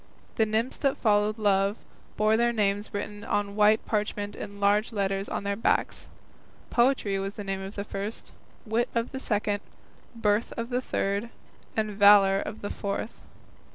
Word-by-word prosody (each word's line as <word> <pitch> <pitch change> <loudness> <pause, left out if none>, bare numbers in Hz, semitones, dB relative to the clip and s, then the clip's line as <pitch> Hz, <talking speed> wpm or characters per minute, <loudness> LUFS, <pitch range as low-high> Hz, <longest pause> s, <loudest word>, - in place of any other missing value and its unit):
The 220 - +3
nymphs 225 +4 -1
that 275 -1 +1
followed 210 0 +2
Love 200 0 +2 0.4
bore 215 +1 +3
their 235 +1 +3
names 205 -2 0
written 205 0 -5
on 200 -1 -1
white 210 +1 +4
parchment 210 -1 -2
in 200 -1 -8
large 205 +3 +2
letters 195 -2 -1
on - - -3
their 200 0 -1
backs. 225 - 0 0.6
"Poetry" 235 -5 +2
was 195 +1 -4
the 205 - -6
name 195 -1 -3
of 195 +2 -7
the 200 - -3
first, 205 +2 -5 0.3
"Wit" 225 +2 0
of 230 +1 0
the 265 - -5
second, 210 -4 0 0.6
"Birth" 210 0 +1
of 230 +1 -4
the 250 +1 +1
third, 200 -2 -1 0.5
and 215 -1 0
"Valour" 200 -1 +6
of 220 - -6
the 205 - -4
fourth. 200 +3 -4
210 Hz, 165 wpm, -27 LUFS, 200-220 Hz, 0.6 s, Valour